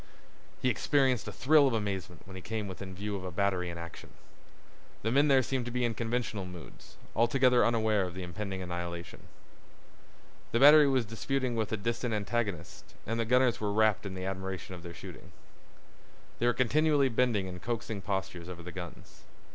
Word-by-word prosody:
He 130 - +4
experienced 130 -2 +2
a - - -4
thrill 145 +1 +5
of 125 - +1
amazement 95 -5 -4
when 95 0 -11
he 95 - -7
came 110 +1 -4
within 95 0 -7
view 100 +2 -4
of 95 - -5
a 95 - -4
battery 95 -1 0
in 85 - -6
action. 85 0 -9 0.9
The 110 - 0
men 140 +4 +4
there 135 -2 +5
seemed 130 -1 -2
to 120 - -4
be 125 0 0
in 115 - 0
conventional 115 -3 -2
moods, 90 -2 -11 0.2
altogether 125 +1 +4
unaware 110 -4 +2
of 90 - -9
the 95 - -5
impending 95 +2 -5
annihilation. 85 -1 -6 1.3
The 115 - +3
battery 145 +2 +9
was 130 -3 +2
disputing 125 +3 -2
with 110 -2 -1
a 110 - 0
distant 115 +2 -2
antagonist 100 -5 -3
and 115 +2 -2
the 115 - +1
gunners 125 0 +3
were 105 -1 0
wrapped 110 -1 +2
in 95 -1 -6
admiration 95 -1 -4
of 90 - -8
their 85 -1 -9
shooting. - - -11 1.1
They 120 - +2
were 120 - +4
continually 145 +3 +3
bending 115 -4 +1
in 90 -1 -7
coaxing 110 -1 -4
postures 90 -3 -4
over 85 -1 -8
the 90 - -7
guns. 90 -1 -10
105 Hz, 180 wpm, -30 LUFS, 95-120 Hz, 1.3 s, battery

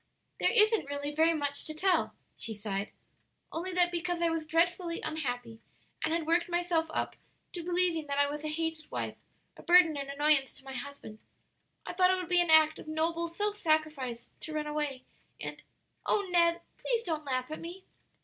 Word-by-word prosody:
"There - - +3
isn't 430 -8 +4
really 285 +1 -3
very 325 +2 +4
much 285 -2 -2
to 310 - -6
tell," 370 +3 +1 0.2
she 220 - -4
sighed, 205 -1 -3 0.6
"only 355 +3 -3
that 355 -1 +3
because 350 0 -2
I 340 -1 +2
was 325 -1 -2
dreadfully 340 +1 +1
unhappy 245 -7 -4 0.4
and 315 - 0
had 330 -1 0
worked 340 +2 +2
myself 345 -2 +1
up - - -2 0.4
to 350 - -4
believing 350 -3 +1
that 280 0 -2
I 285 0 +4
was 295 +1 -5
a - - -2
hated 320 0 -3
wife, - - -3 0.4
a - - -11
burden 345 -3 +6
and 275 0 -4
annoyance 285 -1 +3
to - - -11
my 265 - -7
husband, 265 -5 -8 0.7
I - - -5
thought 365 0 +4
it 370 - +4
would 365 -1 -5
be 355 -1 +5
an 345 - 0
act 315 0 +6
of - - -10
noble 330 +2 0
self 410 +5 -1
sacrifice 310 - -1
to 315 - -7
run 305 0 -1
away, 295 -3 -2 0.4
and - - -6 0.5
O 405 -2 +2
Ned, 340 -1 +4 0.2
please 470 -2 0
don't 320 -5 -2
laugh 255 0 -2
at 310 - -4
me!" 355 +3 -8
320 Hz, 190 wpm, -31 LUFS, 285-350 Hz, 0.7 s, burden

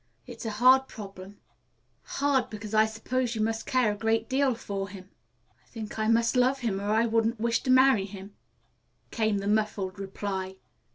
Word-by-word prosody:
"It's 225 - -8
a 210 -1 -4
hard 260 +3 +6
problem 195 -1 -10 0.8
hard 275 -3 +1
because 215 0 -8
I 215 0 +5
suppose 240 +2 -2
you 220 - -2
must 225 +1 -2
care 255 -5 +2
a - - -4
great 225 +1 0
deal 265 -1 +1
for 200 -3 -5
him." 190 -1 -12 0.5
"I - - -34
think 220 -2 -7
I 215 - 0
must 230 +2 +2
love 255 +2 +2
him, 200 -5 -1
or 205 - -3
I 220 +2 +3
wouldn't 225 0 +1
wish 230 +1 +1
to 260 - -5
marry 255 -5 +5
him," 200 0 -10 0.8
came 220 -3 0
the 200 0 -3
muffled 210 -2 -1
reply. 190 -1 -4
220 Hz, 180 wpm, -27 LUFS, 200-235 Hz, 0.8 s, hard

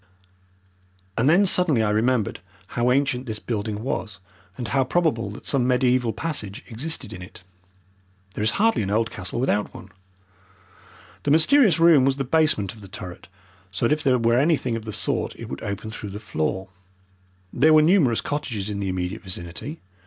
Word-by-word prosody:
And 120 +5 +2
then 185 +5 +5
suddenly 170 -11 +3
I 105 - +1
remembered 110 0 +1 0.3
how 120 +1 0
ancient 135 -1 +1
this 110 -1 -3
building 110 -1 -4
was, 110 -5 -3 0.4
and 120 -3 -4
how 135 -1 +2
probable 130 - 0
that 105 - -10
some 130 -3 +1
mediaeval 125 -2 +2
passage 125 -12 -4
existed 125 -2 -3
in 90 - -9
it. 90 0 -12 0.9
There 105 - -3
is 110 - +3
hardly 225 - +3
an 95 - -2
old 110 +2 0
castle 90 +6 -5
without 105 -5 0
one. - - -11 1.3
The - - -2
mysterious 175 - +5
room 165 -5 +6
was 135 0 +2
the 135 - -2
basement 135 - +1
of 110 - -15
the 100 - -11
turret, 95 -4 -9 0.4
so 95 - -1
that 115 - +3
if 155 - -2
there 130 -3 +3
were 115 +1 +2
anything 140 -5 +1
of 115 -1 -6
the 110 - -5
sort 100 -3 -2
it - - -9
would 65 - -6
open 100 +1 -5
through 105 -1 -7
the 100 +2 -7
floor. 95 -1 -3 0.8
There 155 +6 +4
were 155 0 +7
numerous 155 - +3
cottages 115 -9 -3
in 100 - -4
the 100 -1 -2
immediate 90 +3 -3
vicinity. 95 - -7
120 Hz, 180 wpm, -23 LUFS, 105-145 Hz, 1.3 s, were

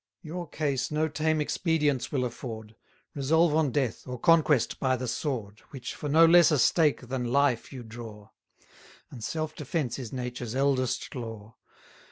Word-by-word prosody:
Your 170 0 -6
case 140 -4 -1
no 155 +1 0
tame 155 0 0
expedients 150 -5 0
will 130 -3 0
afford: 110 -3 -7 0.4
Resolve 155 +3 +2
on 155 -3 +3
death, 130 -3 -2
or 125 0 -5
conquest 155 -4 +3
by 130 -1 +2
the 130 0 -4
sword, 115 -5 -3
Which 130 -3 -7
for 150 - -5
no 160 +3 +7
less 170 0 +7
a 150 - +2
stake 150 +2 +3
than 125 -1 -3
life 140 -3 +2
you 130 -3 -8
draw; 110 -2 -10 0.8
And 120 -4 -9
self 155 +5 -3
defence 140 -4 -3
is 120 -4 -6
nature's 125 -2 -5
eldest 130 -2 0
law. 115 -3 -7
135 Hz, 160 wpm, -28 LUFS, 120-155 Hz, 0.8 s, no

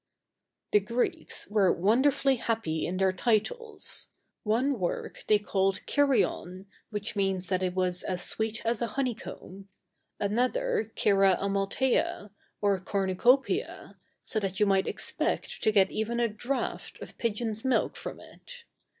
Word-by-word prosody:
The 210 - +6
Greeks 245 - -2
were 205 -3 +3
wonderfully 260 +7 +3
happy 220 -10 -1
in 185 - -3
their 190 0 +2
titles. 240 - +1 0.3
One 240 +4 +1
work 175 -2 -3
they 210 - +5
called 195 -2 0
Κηριον, 235 -9 +1 0.2
which 210 0 -4
means 195 -2 0
that 185 -1 +1
it 180 -1 -1
was 180 -1 0
as 180 -1 -3
sweet 220 +3 -2
as 230 0 0
a 235 - +1
honeycomb; 210 -6 -5 0.5
another 245 - 0
Κερας 195 -3 +4
Αµαλθειας, 200 +2 0 0.3
or 200 -2 +2
Cornu 190 0 -1
Copiæ, 270 - +1 0.3
so 220 - -2
that 195 -2 -3
you 210 - +5
might 195 -1 +2
expect - - -2
to 215 - +3
get 195 -3 +4
even 230 +2 -2
a 235 - +3
draft 240 +5 -4
of - - -11
pigeon's 225 -1 -2
milk 260 -1 +1
from - - -7
it. - - -13
210 Hz, 140 wpm, -28 LUFS, 195-245 Hz, 0.5 s, The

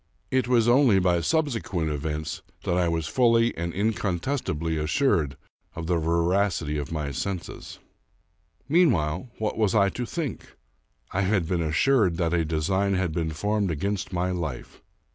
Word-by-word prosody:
It 130 -3 +1
was 120 -2 +3
only 120 -4 +5
by 90 -2 +2
sub 160 - +1
sequent 90 -8 -2
events 75 +1 -3 0.2
that 90 - 0
I 90 -1 +2
was 80 -1 -1
fully 115 - +3
and 85 +1 -3
incontestably 95 - -1
assured 75 - +1 0.4
of 85 - -5
the 85 0 +1
veracity 85 -1 +1
of 70 - -5
my 75 -3 -3
senses. 90 +5 -5 0.9
Meanwhile, 120 - +2
what 110 0 -2
was 105 -2 +2
I 100 -2 +4
to 120 +4 -4
think? 155 - -5 0.6
I 100 - 0
had 95 -3 +1
been 85 -1 0
assured 90 - +2
that 85 -1 0
a 85 -1 +2
design 95 +6 0
had 95 -3 0
been 80 0 -1
formed 105 +5 -1
against 95 +6 -2
my 90 0 -1
life. 80 -9 -5
90 Hz, 155 wpm, -26 LUFS, 80-110 Hz, 0.9 s, only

